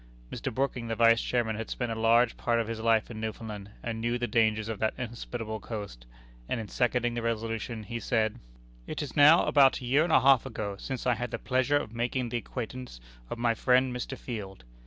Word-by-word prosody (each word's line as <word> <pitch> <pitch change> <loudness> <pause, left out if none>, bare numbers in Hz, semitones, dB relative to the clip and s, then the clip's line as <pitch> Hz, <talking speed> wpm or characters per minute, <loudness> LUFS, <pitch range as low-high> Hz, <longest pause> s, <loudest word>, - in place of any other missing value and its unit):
Mr. - - -4
Brooking, 125 -1 -2
the 115 - -2
Vice 115 0 +5
Chairman, 115 -3 0
had 115 - -5
spent 120 -2 -3
a - - -2
large 115 +1 +3
part 120 -1 0
of 115 - -1
his 115 -1 -4
life 115 0 +2
in 110 -1 -7
Newfoundland, 105 -2 -6
and 115 -1 -3
knew 120 +1 0
the 120 - -1
dangers 110 -2 +1
of 110 -2 -4
that 110 - 0
inhospitable 115 -2 -5
coast, 100 - -7 0.4
and 120 - -1
in 110 - -5
seconding 120 -1 +1
the 120 - -2
resolution 115 0 -3
he 115 +2 -5
said: 110 -2 0 0.5
"It - - -3
is 145 - -7
now 150 +4 +7
about 135 -2 +5
a 125 - -8
year 135 +5 +3
and 170 - -1
a - - +7
half 135 -2 +5
ago 110 -6 -4
since 130 -2 -5
I 125 - +4
had 120 +1 -3
the - - -3
pleasure 130 +2 +1
of 115 -6 -4
making 120 +1 -1
the 120 - -1
acquaintance 125 - -6 0.3
of - - -4
my 120 0 +2
friend 125 +2 +2
Mr. 125 +2 -4
Field. 100 - -7
115 Hz, 220 wpm, -29 LUFS, 110-125 Hz, 0.5 s, now